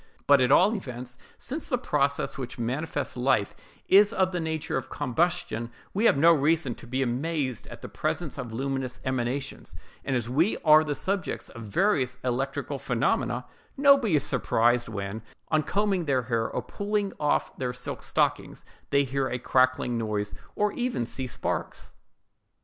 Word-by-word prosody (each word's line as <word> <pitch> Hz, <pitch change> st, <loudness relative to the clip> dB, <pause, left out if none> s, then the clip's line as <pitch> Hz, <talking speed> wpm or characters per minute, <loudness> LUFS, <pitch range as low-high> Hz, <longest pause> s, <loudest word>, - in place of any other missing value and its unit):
But 140 Hz, -2 st, +6 dB
at 125 Hz, +1 st, +3 dB
all 190 Hz, +9 st, +6 dB
events, 125 Hz, -, -6 dB, 0.2 s
since 290 Hz, +6 st, -4 dB
the 250 Hz, -, +2 dB
process 140 Hz, -, 0 dB
which 130 Hz, -3 st, -6 dB
maintains 135 Hz, +3 st, -2 dB
life 125 Hz, -5 st, +1 dB, 0.3 s
is 205 Hz, +2 st, +6 dB
of 190 Hz, -3 st, +1 dB
the 180 Hz, -, -2 dB
nature 160 Hz, -2 st, -2 dB
of 130 Hz, -, -3 dB
combustion, 130 Hz, -5 st, -1 dB, 0.2 s
we 210 Hz, +4 st, +1 dB
have 145 Hz, -, +5 dB
no 165 Hz, +4 st, +7 dB
reason 155 Hz, -2 st, +2 dB
to 120 Hz, -, -14 dB
be 130 Hz, +2 st, 0 dB
amazed 130 Hz, 0 st, -2 dB
at -, -, -11 dB
the -, -, -5 dB
presence -, -, -3 dB
of 120 Hz, -3 st, -5 dB
luminous 135 Hz, +1 st, -3 dB
emanations; 130 Hz, +1 st, -3 dB, 0.3 s
and 135 Hz, -, -1 dB
as 120 Hz, -2 st, -1 dB
we 155 Hz, -, +2 dB
are 155 Hz, 0 st, +8 dB
the 150 Hz, -2 st, -2 dB
subjects 190 Hz, +4 st, -2 dB
of 120 Hz, -, -10 dB
various 130 Hz, -, +1 dB
electrical 130 Hz, +2 st, -2 dB
phenomena, -, -, 0 dB, 0.3 s
nobody 275 Hz, -, +5 dB
is 145 Hz, -, +3 dB
surprised 120 Hz, -1 st, +2 dB
when, 100 Hz, 0 st, -4 dB, 0.3 s
on 155 Hz, -1 st, +3 dB
combing 195 Hz, +1 st, 0 dB
their 130 Hz, -4 st, +1 dB
hair 115 Hz, -1 st, -1 dB
or -, -, -3 dB
pulling 205 Hz, -1 st, -2 dB
off 150 Hz, -1 st, 0 dB
their 125 Hz, -2 st, -1 dB
silk 125 Hz, 0 st, -6 dB
stockings, -, -, -1 dB, 0.2 s
they 140 Hz, 0 st, +3 dB
hear 135 Hz, 0 st, -1 dB
a 125 Hz, -, -2 dB
crackling 130 Hz, -1 st, +2 dB
noise, 105 Hz, -2 st, -2 dB, 0.2 s
or 210 Hz, 0 st, +1 dB
even 245 Hz, -, -1 dB
see 130 Hz, +2 st, -1 dB
sparks. 120 Hz, -, -4 dB
135 Hz, 165 wpm, -27 LUFS, 125-170 Hz, 0.3 s, are